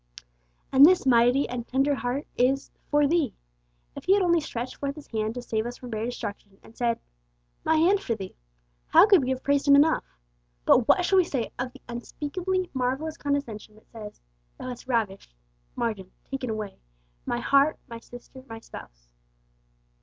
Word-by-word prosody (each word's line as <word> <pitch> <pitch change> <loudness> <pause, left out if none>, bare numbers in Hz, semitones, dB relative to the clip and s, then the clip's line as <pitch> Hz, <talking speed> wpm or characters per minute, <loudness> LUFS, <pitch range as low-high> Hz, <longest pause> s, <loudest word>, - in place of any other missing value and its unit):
And 270 +1 +7
this 360 +1 +7
mighty 245 +2 +4
and 245 -1 -5
tender 270 +3 +2
heart 270 +2 -2
is 265 +2 +1 0.2
'for 295 0 +4
thee!' 300 -5 +1 0.6
If - - -9
He 380 - +5
had 400 - +2
only 340 -2 +3
stretched 245 -4 -5
forth 280 0 -3
His 300 - -11
hand 220 0 -3
to 245 - -5
save 220 -1 -2
us 245 - -7
from 250 -1 -10
bare 220 0 -2
destruction, 205 -4 -6
and 225 - -17
said, 235 -1 0 0.6
'My 320 - +2
hand 355 +6 +4
for 235 -12 -2
thee!' 190 -3 -8 0.5
how - - +7
could 400 -6 +6
we 255 - -2
have 260 0 -2
praised 285 0 +1
Him 280 - +8
enough? 305 +3 +4 0.6
But 245 - +5
what 360 -2 +4
shall 385 0 +4
we - - +5
say 260 -8 -3
of 250 0 -2
the - - -17
unspeakably 345 +10 -3
marvellous 265 +5 -1
condescension 260 -7 -3
which 215 - -22
says, 215 -3 -10 0.4
'Thou 255 - -6
hast 250 0 -8
ravished 210 - -2 0.4
(margin, 210 -6 -3 0.2
taken 265 -2 -3
away) 215 -2 -5 0.5
my 240 - 0
heart, 275 +5 +3
my 230 -1 -8
sister, 245 +2 -13
my 225 - -7
spouse!' - - -13
255 Hz, 180 wpm, -26 LUFS, 230-290 Hz, 0.6 s, Him